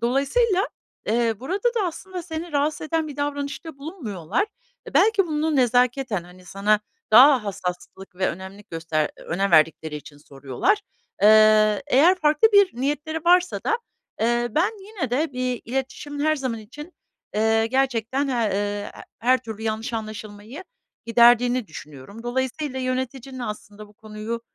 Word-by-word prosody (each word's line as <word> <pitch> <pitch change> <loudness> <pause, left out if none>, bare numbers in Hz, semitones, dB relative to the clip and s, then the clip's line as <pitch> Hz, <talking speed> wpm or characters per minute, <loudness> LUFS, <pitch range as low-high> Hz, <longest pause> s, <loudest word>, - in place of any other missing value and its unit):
dolayısıyla, 320 - +1 0.4
eee, 230 0 +1
burada 380 - -1
da 415 -5 +1
aslında 360 +1 -6
seni 330 0 -6
rahatsız 295 +1 0
eden 320 0 -1
bir 285 - -9
davranışta 285 +1 -4
bulunmuyorlar. 275 - -3 0.4
E, - - -13
belki 415 -3 +4
bunu 310 -1 0
nezaketen, 245 -5 +2
hani, 180 +1 -16
sana 205 +3 +1 0.3
daha 255 +1 +7
hassaslık 190 0 -6
ve 190 0 +1
önemlilik 190 +3 -9
göster 165 -2 -1
önem 195 +3 -2
verdikleri 155 -1 +3
için 145 0 -12
soruyorlar, 145 - -1 0.4
eee, 215 0 +6
eğer 290 +7 +5
farklı 305 +7 +4
bir 405 -2 +6
niyetleri 295 +4 -2
varsa 360 +1 +3
da, 460 - +1 0.4
eee, 240 +1 +1
ben 335 - +2 0.2
yine 385 - -4
de 295 +4 0
bir 250 -1 -2
iletişimin 270 +4 -4
her 310 0 +2
zaman 255 -4 -3
için, 295 +11 -11 0.4
eee, 220 +1 +2
gerçekten 260 +1 0
he - - -1 0.2
ııı, 205 +1 -2
he - - -9 0.3
her 255 +3 +3
türlü 220 -2 -8
yanlış 220 +2 -3
anlaşılmayı 215 - -7 0.4
giderdiğini 240 +1 +4
düşünüyorum. 155 - -11
Dolayısıyla 260 +3 -3
yöneticinin 260 0 -4
aslında 210 -2 -7
bu - - -20
konuyu, 215 +2 -6
245 Hz, 140 wpm, -23 LUFS, 210-295 Hz, 0.4 s, daha